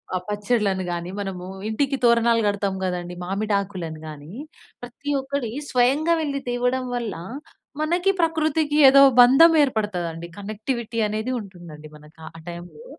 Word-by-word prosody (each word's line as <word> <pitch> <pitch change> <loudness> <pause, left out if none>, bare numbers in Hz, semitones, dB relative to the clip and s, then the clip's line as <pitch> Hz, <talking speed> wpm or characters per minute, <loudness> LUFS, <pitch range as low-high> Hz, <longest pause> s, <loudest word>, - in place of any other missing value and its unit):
ఆ - - +2
పచ్చడ‌లను 205 -2 0
గాని, 175 0 -4
మనము 190 -2 -6 0.2
ఇంటికి 275 +5 -1
తోరణాలు 235 -1 +4
కడతాం 200 -1 -1
కదండీ 180 -1 -3
మామిడాకులను 195 -4 -3
గాని, 150 +1 -10 0.5
ప్రతి 245 +4 -8
ఒక్కటి 270 -3 -3 0.2
స్వయంగా 275 +7 +2
వెళ్లి 285 -3 -2
తేవడం 250 +1 -1
వల్ల 235 -4 -3 0.7
మనకి 350 +5 +1
ప్రకృతికి 315 -2 0
ఏదో 275 +1 +7 0.2
బంధం 270 +7 +7
ఏర్పడతదండి 180 - -3
కనెక్టివిటీ 220 +3 -5
అనేది 215 +4 -3
ఉంటుందండి 175 -7 -11
మనకి 150 +2 -19
ఆ - - -7 0.2
టైమ్‌లో. 175 - -10
220 Hz, 125 wpm, -23 LUFS, 185-265 Hz, 0.7 s, ఏదో